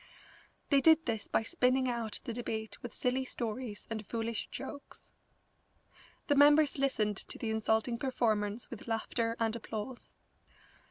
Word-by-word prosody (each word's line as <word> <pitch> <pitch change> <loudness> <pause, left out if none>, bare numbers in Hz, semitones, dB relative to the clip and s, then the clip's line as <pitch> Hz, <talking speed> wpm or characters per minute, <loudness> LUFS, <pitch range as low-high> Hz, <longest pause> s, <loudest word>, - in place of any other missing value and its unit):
They 280 -1 +6
did 320 +2 +6
this 220 -3 -2
by - - +1
spinning 255 -2 +2
out 235 -3 -2
the 235 - -4
debate 220 -2 -4
with 245 -3 -6
silly 255 +1 0
stories 235 -3 -4
and 220 -2 -4
foolish 225 +1 -3
jokes. 280 +1 -8 1.1
The 290 - +3
members 290 0 +6
listened 215 -7 +1
to - - -5
the 225 - -2
insulting 220 +2 +1
performance 225 -4 0
with 235 -1 -8
laughter 230 0 -1
and 225 0 +1
applause. 230 +2 -6
235 Hz, 140 wpm, -32 LUFS, 220-260 Hz, 1.1 s, They